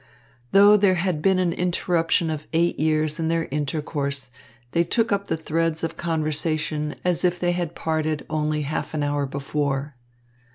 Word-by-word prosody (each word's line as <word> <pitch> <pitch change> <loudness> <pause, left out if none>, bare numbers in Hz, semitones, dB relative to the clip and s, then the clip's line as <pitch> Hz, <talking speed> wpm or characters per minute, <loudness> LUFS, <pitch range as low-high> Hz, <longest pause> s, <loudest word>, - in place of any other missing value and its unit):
Though 205 +1 +7
there 195 -2 +4
had 175 -3 -1
been 190 +2 +3
an 180 -2 +1
interruption 170 -2 +1
of 155 -1 -5
eight 170 +1 +1
years 155 0 +1
in 160 - 0
their 165 0 +1
intercourse, 140 -2 -2 0.4
they 170 - +3
took 225 +6 +1
up 200 0 0
the 160 - -1
threads 160 0 -1
of 165 0 -2
conversation 155 -2 -1
as 180 -1 +1
if 180 -1 +1
they 175 0 +1
had 175 -2 -3
parted 155 -2 -1
only 150 0 -1
half 155 +2 -3
an 150 - 0
hour 145 -1 0
before. 140 0 -2
160 Hz, 165 wpm, -24 LUFS, 150-175 Hz, 0.4 s, Though